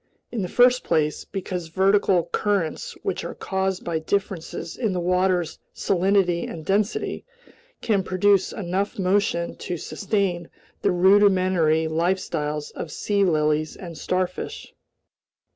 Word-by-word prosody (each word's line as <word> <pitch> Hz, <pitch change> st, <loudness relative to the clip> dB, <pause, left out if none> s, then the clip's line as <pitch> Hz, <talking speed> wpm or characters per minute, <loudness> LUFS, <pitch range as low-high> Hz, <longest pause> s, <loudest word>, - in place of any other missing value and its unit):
"In 230 Hz, -, -2 dB
the 185 Hz, -, -2 dB
first 250 Hz, +1 st, +4 dB
place, 150 Hz, -1 st, 0 dB
because 180 Hz, -3 st, -5 dB
vertical 190 Hz, +1 st, +3 dB
currents, 205 Hz, -, -1 dB
which -, -, -2 dB
are -, -, -6 dB
caused 190 Hz, -1 st, -2 dB
by 165 Hz, -2 st, -1 dB
differences 170 Hz, -1 st, -3 dB
in 220 Hz, -6 st, -1 dB
the 180 Hz, -, -1 dB
water's 180 Hz, -1 st, +1 dB, 0.2 s
salinity 190 Hz, -2 st, +1 dB
and 160 Hz, -2 st, -8 dB
density, 205 Hz, +2 st, 0 dB, 0.6 s
can 205 Hz, -4 st, +1 dB
produce 190 Hz, +1 st, +2 dB
enough 195 Hz, 0 st, -2 dB
motion 185 Hz, -3 st, +1 dB
to 175 Hz, -, -4 dB
sustain 190 Hz, -2 st, -2 dB, 0.3 s
the -, -, +2 dB
rudimentary 185 Hz, -4 st, +4 dB
lifestyles 160 Hz, -3 st, -1 dB
of 155 Hz, -, -7 dB
sea 205 Hz, -1 st, 0 dB
lilies 155 Hz, -3 st, +1 dB
and 170 Hz, -3 st, -8 dB
starfish." 180 Hz, +3 st, -3 dB
185 Hz, 125 wpm, -24 LUFS, 170-200 Hz, 0.6 s, first